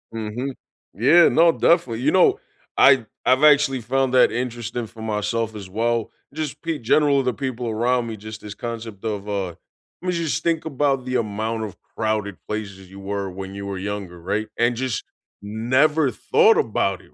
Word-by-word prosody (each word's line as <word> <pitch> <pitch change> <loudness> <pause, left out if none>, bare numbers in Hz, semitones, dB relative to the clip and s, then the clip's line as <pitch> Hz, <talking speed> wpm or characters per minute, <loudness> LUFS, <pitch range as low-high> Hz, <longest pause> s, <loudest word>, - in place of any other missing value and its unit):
Mhm. 115 +5 -4 0.4
Yeah, 155 +10 +6
no, 165 0 +5
definitely, 130 -10 +2
you 150 - +2
know, 185 - +4 0.4
I 135 -4 +6 0.2
I've 130 +3 +3
actually 145 -4 +5
found 130 +3 0
that 125 - +5
interesting 120 -1 -3
for 110 - -13
myself 110 +1 -2
as 100 -3 -8
well, 115 +2 -1 0.2
just 155 -2 -5
pe 165 -2 -2
general 140 +3 +3
the 125 - 0
people 125 -3 -4
around 120 +2 0
me, 110 -1 -6
just 110 +1 -9
this 105 -1 -8
concept 115 -3 -7
of, 105 -2 -3
uh, 100 -3 -1
I - - -17 0.5
mean, 180 0 -1
just 170 -3 -1
think 165 -2 0
about 135 -3 0
the 130 0 -3
amount 110 +1 -2
of 100 -5 -7 0.2
crowded 110 -3 -1
places 100 -3 -6
you 95 +1 -12
were 100 0 -3
when 95 +1 -7
you 100 0 -6
were 100 -1 -4
younger, 95 -3 -5
right? 105 +5 -2
And 120 0 +3
just 125 -4 -2 0.4
never 130 +8 +2
thought 225 - +4
about 100 -4 0
it, - - -22
115 Hz, 180 wpm, -22 LUFS, 105-135 Hz, 0.5 s, Yeah